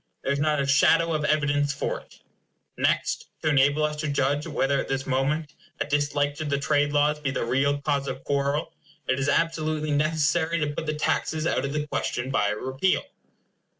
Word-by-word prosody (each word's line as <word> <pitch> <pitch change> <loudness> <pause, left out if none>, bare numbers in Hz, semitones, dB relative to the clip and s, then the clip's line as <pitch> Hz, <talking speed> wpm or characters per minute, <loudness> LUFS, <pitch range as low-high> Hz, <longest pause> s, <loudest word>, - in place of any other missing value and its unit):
There 140 - 0
is 140 - -2
not 150 0 +1
a 140 - +1
shadow 165 +4 +4
of 155 -1 -1
evidence 145 -1 +1
for - - -2
it. - - -20 0.5
Next, - - 0 0.2
to 155 - +2
enable 145 +1 +3
us 150 0 0
to 155 0 -2
judge 145 +2 0
whether 140 -3 +1
at - - -3
this 135 0 -2
moment 145 +3 -1 0.3
a - - 0
dislike 145 0 0
to 155 - -4
the 140 -1 0
trade 145 +1 +1
laws 150 +1 +2
be 145 -2 -2
the 130 - -2
real 140 +4 +1
cause 140 -1 -1
of 135 - -5
quarrel, 140 +2 -1 0.3
it 130 - +1
is 140 +1 0
absolutely 155 -1 0
necessary 155 +2 +1
to 145 -1 -1
put 155 - -5
the 155 - -1
taxes 155 +1 -1
out 165 - 0
of 140 - -3
the 150 0 -1
question 130 -3 -2
by 105 - +2
a 105 - -1
repeal. 130 - 0
145 Hz, 200 wpm, -25 LUFS, 140-155 Hz, 0.5 s, shadow